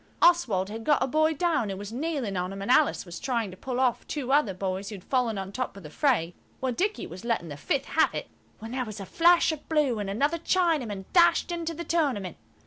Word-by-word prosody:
Oswald 235 - +3
had 225 +1 -6
got 295 +3 +3
a - - +2
boy 310 +3 +2
down, 315 - +1
and 195 - -4
was 205 +2 -7
kneeling 270 -7 -2
on 180 +1 -2
him, 195 0 -6
and 230 - 0
Alice 305 -5 +3
was 175 -1 -8
trying 235 -6 -1
to - - -10
pull 255 +5 -4
off 255 -3 +1
two 270 -4 -3
other 280 -7 +4
boys 190 +1 -3
who 215 - -6
had 185 - -11
fallen 245 -4 0
on 195 0 -5
top 255 -2 -4
of 200 - -11
the 150 - -10
fray, 215 - +1 0.3
while 260 -1 -1
Dicky 400 - -1
was 175 +3 -9
letting 230 -8 -1
the 145 - -6
fifth 270 - -1
have 320 - +2
it, - - -4 0.3
when 225 +1 -8
there 255 0 -1
was 215 -3 -7
a 195 - -6
flash 340 - +4
of 310 -2 -8
blue 295 -8 +2
and 200 -1 -3
another 285 +11 0
Chinaman 310 - 0
dashed 345 0 +4
into 335 -1 -3
the 340 - -5
tournament. 265 - -1
250 Hz, 240 wpm, -27 LUFS, 195-310 Hz, 0.3 s, other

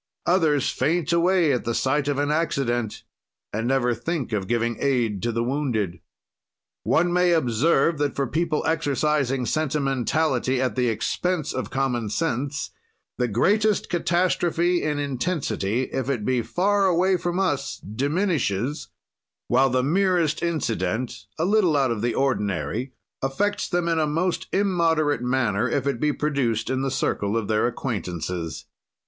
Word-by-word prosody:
Others 160 -6 +2
faint 165 +5 0
away 170 -3 +3
at 125 - -1
sight 140 +2 +1
of 145 -2 0
an 145 +1 0
accident 135 -8 -1 0.5
and 110 +3 -1
never 125 -2 +2
think 130 +1 -3
of 100 -3 -1
giving 120 0 0
aid 120 -8 +1
to 120 - 0
the 115 +1 -1
wounded. 120 - -1 0.8
One 175 +1 +2
may 180 0 +4
observe 150 +2 +2
that 145 -1 0
for 140 - 0
people 160 +3 -1
exercising 145 -4 0
sentimentality 135 -2 0
at 125 -5 0
the 125 -1 +1
expense 170 +8 -1
of 130 - -3
common 125 -5 -1
sense, 140 +1 -2 0.5
the 125 - +2
greatest 205 - +2
catastrophe 175 0 +1
in 150 -1 -1
intensity, 135 - -1
if 130 0 -2
it 120 -7 -1
be 130 -2 +1
far 195 - +1
away 185 +1 +3
from 175 0 -2
us, 145 -8 -1
diminishes, 140 - -1 0.6
while 130 +2 +4
the 130 0 +1
merest 170 0 +1
incident, 115 - -2
a 165 - 0
little 190 -6 +3
out 135 -3 +2
of 110 -3 -2
the 120 -1 0
ordinary, 110 - -1 0.3
affects 205 +11 -1
them 175 -1 0
in 165 -1 +1
a 155 - +2
most 165 +4 -1
immoderate 165 - +1
manner 125 -3 +1
if - - -1
it 140 -4 -1
be 150 +2 +2
produced 130 -7 -1
in 130 0 0
the 135 - 0
circle 105 -5 -1
of 110 -3 -2
their 110 +1 +2
acquaintances. 90 - -4
140 Hz, 145 wpm, -24 LUFS, 120-165 Hz, 0.8 s, may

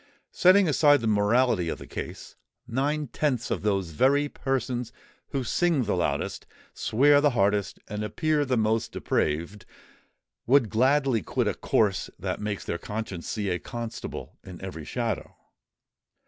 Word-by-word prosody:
Setting 185 +1 +5
aside 145 -1 +5
the - - -3
morality 105 -2 +2
of - - -3
the - - -10
case, - - -7 0.3
nine 140 +5 -1
tenths 130 -5 -1
of - - -1
those 95 -5 0
very 140 - +3
persons 125 -4 -2 0.4
who 135 -2 -2
sing 160 +3 +1
the 105 - -1
loudest, 75 -5 -2 0.3
swear 145 +5 +4
the 145 - +4
hardest, 100 -1 +1
and 105 +1 -4
appear 150 +8 0
the 130 -3 0
most 110 0 0
depraved, 85 +7 -1 0.8
would 130 -4 +4
gladly 130 0 +3
quit - - -1
a - - +1
course 100 -5 +1
that - - -4
makes 105 -1 -3
their 85 - -3
conscience 105 -5 -5
see 105 -3 -2
a 90 - -1
constable 120 +4 -7
in 90 -2 -10
every 85 -5 -7
shadow. 115 +1 -3
115 Hz, 145 wpm, -26 LUFS, 100-135 Hz, 0.8 s, Setting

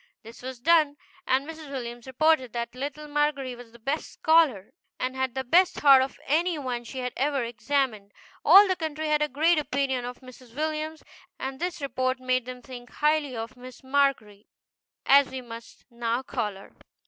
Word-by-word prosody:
This 230 +1 -12
was 255 -1 -7
done, 305 0 +3 0.3
and 265 +2 +1
Mrs. 320 -2 -9
Williams 240 -2 -6
reported 260 -2 +2
that 235 0 -4
little 285 +3 -6
Margery 295 -3 0
was 240 -1 -13
the 235 - -15
best 275 +7 -3
scholar, 310 - +2 0.3
and 255 +1 -2
had 260 -1 -2
the 265 - -2
best 345 +8 +3
heart 275 -2 +8
of 265 - -4
any 335 +4 +1
one 250 -4 -4
she 250 +3 -9
had 250 -1 -3
ever 275 -1 0
examined. 235 -3 -2 0.3
All 390 +6 +8
the 375 - +1
country 315 -2 -3
had 300 0 +2
a 300 - +2
great 315 +4 +3
opinion 270 -3 -1
of 245 +2 -7
Mrs. 255 -2 -15
Williams, 310 +1 -3 0.3
and 265 0 -5
this 350 -3 -3
report 255 -1 -1
made 255 -1 0
them 250 -1 -8
think 245 -1 -10
highly 300 -3 0
of 225 +3 -6
Miss 250 0 -12
MARGERY, 260 -7 0 0.6
as 280 0 +6
we 260 - -5
must 230 -1 -11
now 235 +1 -2
call 230 -6 -3
her. 195 - -14
265 Hz, 185 wpm, -26 LUFS, 245-300 Hz, 0.6 s, heart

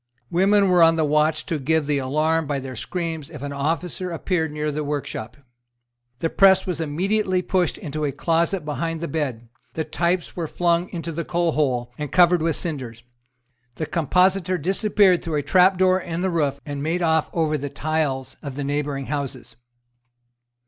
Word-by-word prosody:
Women 195 +3 +4
were 180 -1 +4
on 165 0 +6
the 160 -1 +1
watch 150 +1 +1
to 160 - -2
give 155 +3 +1
the 145 -1 0
alarm 155 +4 0
by 145 -1 -1
their 130 -1 -6
screams 160 +2 -4
if 150 -4 -9
an 140 0 -4
officer 165 +5 -2
appeared 165 -1 -1
near 150 0 -2
the 150 +1 -3
workshop. 140 -6 -4 0.8
The 165 - -1
press 190 -1 +5
was 180 -4 -2
immediately 185 +4 0
pushed 180 -2 0
into 155 +1 -5
a 140 - 0
closet 165 +4 0
behind 160 +3 -3
the 170 - -3
bed; 135 -6 -3 0.3
the 160 - -2
types 170 +3 -1
were 170 -2 -3
flung 170 +2 +1
into 165 -1 -5
the 165 +1 -3
coalhole, 150 -9 0
and 150 -2 -4
covered 175 -1 +5
with 165 -1 +1
cinders: 130 -9 -5 0.7
the 155 - -3
compositor 180 +3 +2
disappeared 190 +2 +3
through 165 -2 -3
a 145 - 0
trapdoor 185 +1 +4
in 170 -1 -4
the 190 - +1
roof, 150 -5 0
and 145 -1 -5
made 165 +4 -1
off 160 -2 +2
over 160 -2 0
the 145 -1 -3
tiles 140 -4 -2
of 140 -3 -6
the 145 - -3
neighbouring 145 -1 -2
houses. 130 -6 -5
160 Hz, 175 wpm, -23 LUFS, 145-175 Hz, 0.8 s, on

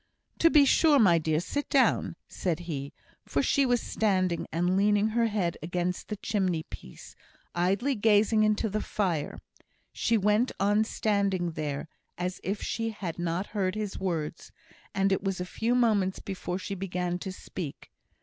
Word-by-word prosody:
"To 330 - +6
be 295 -3 +6
sure, 295 +2 +5
my 180 -9 +5
dear! 155 -1 +1
Sit 285 - -3
down," 270 -2 +2
said 175 -2 -2
he; 145 -5 -5 0.4
for 140 - 0
she 275 - +3
was 245 -1 +2
standing 185 -5 0
and 175 +3 +1
leaning 205 +2 +3
her 230 +1 +2
head 195 -6 -1
against 175 +2 -2
the 210 - -3
chimney 190 -6 -1
piece, 65 - -12 0.4
idly 195 +10 +1
gazing 215 -1 +3
into 215 +1 +2
the 215 +1 -2
fire. 175 -8 -2 0.6
She 230 - +1
went 210 +4 +2
on 205 +2 +3
standing 200 -5 0
there, 150 -2 -4 0.3
as 180 +1 -3
if 200 +2 -3
she 225 0 -2
had 185 -6 -5
not 175 +2 -1
heard 190 -2 0
his 210 -2 -4
words; 165 -4 -3 0.4
and 195 0 +2
it 190 - +1
was 195 -2 -1
a 180 - -2
few 225 +6 -1
moments 210 -6 +2
before 185 -2 -4
she 195 - -5
began 180 -2 -2
to 190 - -5
speak. 180 -4 -7
195 Hz, 165 wpm, -28 LUFS, 175-215 Hz, 0.6 s, To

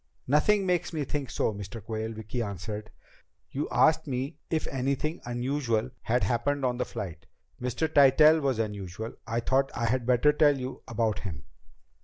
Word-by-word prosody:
"Nothing 190 +9 +3
makes 180 -1 0
me 155 -2 -1
think 140 -1 -3
so, 110 - 0
Mr. 100 +2 -7
Quayle," 110 +1 -4
Vicki 110 +2 -4
answered. 105 +1 -5 0.6
"You 145 +2 -2
asked 160 0 +3
me 135 +3 -3
if 160 -1 0
anything 140 +5 -2
unusual 120 -1 -1
had 125 +2 +1
happened 135 +3 0
on 125 -1 0
the 125 - +1
flight. 85 -7 -7 0.3
Mr. 125 +6 0
Tytell 150 +2 +6
was 135 -4 +1
unusual, 105 -2 -3
and - - -15
I 115 +1 0
thought 135 +3 +2
I 115 - -1
had 120 +1 0
better 125 +4 +4
tell 145 -2 +4
you 130 0 -6
about 115 -2 0
him." 85 -9 -6
125 Hz, 170 wpm, -28 LUFS, 110-145 Hz, 0.6 s, Tytell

